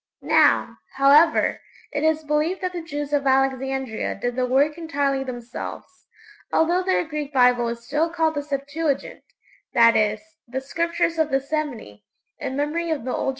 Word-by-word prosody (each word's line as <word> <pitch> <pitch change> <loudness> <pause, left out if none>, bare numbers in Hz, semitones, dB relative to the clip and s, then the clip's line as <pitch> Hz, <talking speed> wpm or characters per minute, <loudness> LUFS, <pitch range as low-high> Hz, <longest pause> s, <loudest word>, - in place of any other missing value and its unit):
Now, - - +3 0.2
however, 285 +4 +4 0.3
it 290 0 -2
is 315 0 +2
believed 300 +5 0
that 365 -1 -2
the 350 - -4
Jews 295 -2 -5
of 280 -1 +1
Alexandria 265 -2 0
did 245 +4 -3
the 255 0 0
work 280 +4 +2
entirely 285 -5 -1
themselves, 250 +8 -8 0.4
although 345 +3 +2
their 370 -1 +1
Greek 300 -2 -4
Bible 250 -3 +4
is 235 0 -5
still 300 +5 0
called 325 -2 0
the 290 - -2
'Septuagint' 285 +1 -3 0.5
that 230 -2 +6
is, 215 -1 +2 0.3
'The 260 +2 -4
Scriptures 335 +3 -1
of 315 -1 +2
the 270 - +2
Seventy' 270 - -5 0.4
in 260 - -4
memory 320 +4 -1
of 310 -6 -2
the 255 - -3
old - - -2
tradition. - - +1
285 Hz, 165 wpm, -23 LUFS, 260-315 Hz, 0.5 s, that